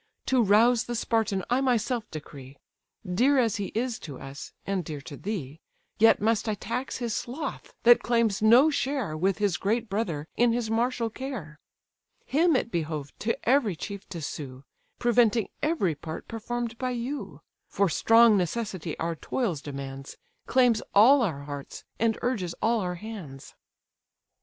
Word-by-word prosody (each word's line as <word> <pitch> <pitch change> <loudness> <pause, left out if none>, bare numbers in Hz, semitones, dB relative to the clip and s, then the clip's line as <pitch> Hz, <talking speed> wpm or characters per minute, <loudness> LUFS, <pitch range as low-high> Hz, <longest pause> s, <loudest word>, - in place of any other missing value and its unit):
To 260 -2 +3
rouse 225 +3 +4
the 240 - -4
Spartan 220 -4 0
I 250 +2 +1
myself 245 -2 0
decree; 140 -3 -10 0.5
Dear 250 +11 +3
as 230 -3 +2
he 200 -2 -3
is 240 +1 -1
to 140 -5 -8
us, 135 +1 -9
and 195 -2 -1
dear 150 -2 -6
to 145 +1 -9
thee, 160 -6 -5 0.4
Yet 225 +1 +6
must 220 +1 +1
I 215 - 0
tax 245 +6 -4
his 235 -3 -3
sloth, 265 +5 -5
that 240 0 +7
claims 230 -4 +1
no 240 +8 +6
share 270 - -1
With 190 +4 +1
his 205 -6 +1
great 220 +6 -1
brother 175 -8 -2
in 240 -1 +3
his 235 -2 -2
martial 230 0 0
care: 210 - -7 0.7
Him 320 +3 +3
it 235 - 0
behoved 155 -5 -4
to 230 - -1
every 240 -7 +3
chief 200 +4 -7
to 170 -5 -6
sue, 135 -3 -6 0.3
Preventing 235 -3 +3
every 295 - +1
part 155 +2 -8
perform'd 235 +1 -4
by 255 - -1
you; 235 - -5 0.3
For 200 0 +2
strong 225 +5 +5
necessity 185 -3 -2
our 165 0 -2
toils 175 - -2
demands, 135 -1 -7 0.3
Claims 245 -3 +3
all 255 +7 +7
our 160 -11 -1
hearts, 145 -1 -8 0.2
and 225 -1 +2
urges 200 -9 -1
all 230 0 +2
our 180 -3 -2
hands." 175 -9 -9
220 Hz, 155 wpm, -27 LUFS, 165-240 Hz, 0.7 s, that